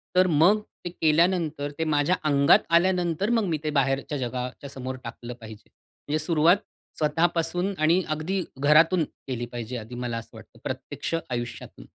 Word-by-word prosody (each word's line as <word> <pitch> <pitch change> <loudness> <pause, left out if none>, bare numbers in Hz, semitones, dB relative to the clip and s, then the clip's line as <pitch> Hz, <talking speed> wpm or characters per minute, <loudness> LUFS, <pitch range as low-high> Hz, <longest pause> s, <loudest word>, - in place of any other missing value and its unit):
तर 185 0 +5
मग 175 +7 +4 0.2
ते - - -2
केल्यानंतर 160 -3 +1
ते - - +1
माझ्या 145 +5 +2
अंगात 140 -1 +5 0.2
आल्यानंतर 180 +1 +1
मग 235 -2 +2
मी 160 - 0
ते 155 - -1
बाहेरच्या 135 +2 -1
जगाच्या 125 +2 -5
समोर 130 -1 -6
टाकलं 120 0 -7
पाहिजे. 110 -1 -12 0.4
म्हणजे 150 +2 0
सुरुवात 165 +3 +4 0.4
स्वतःपासून 170 +4 +1
आणि 165 +4 +4
अगदी 160 +5 -1
घरातून 155 +5 +4
केली 125 -5 -6
पाहिजे 120 +1 -5
आधी 115 +2 -8
मला 120 -1 -2
असं 115 - -8
वाटतं - - -15
प्रत्यक्ष - - -4
आयुष्यातून. 120 -2 -6
155 Hz, 150 wpm, -26 LUFS, 130-175 Hz, 0.4 s, तर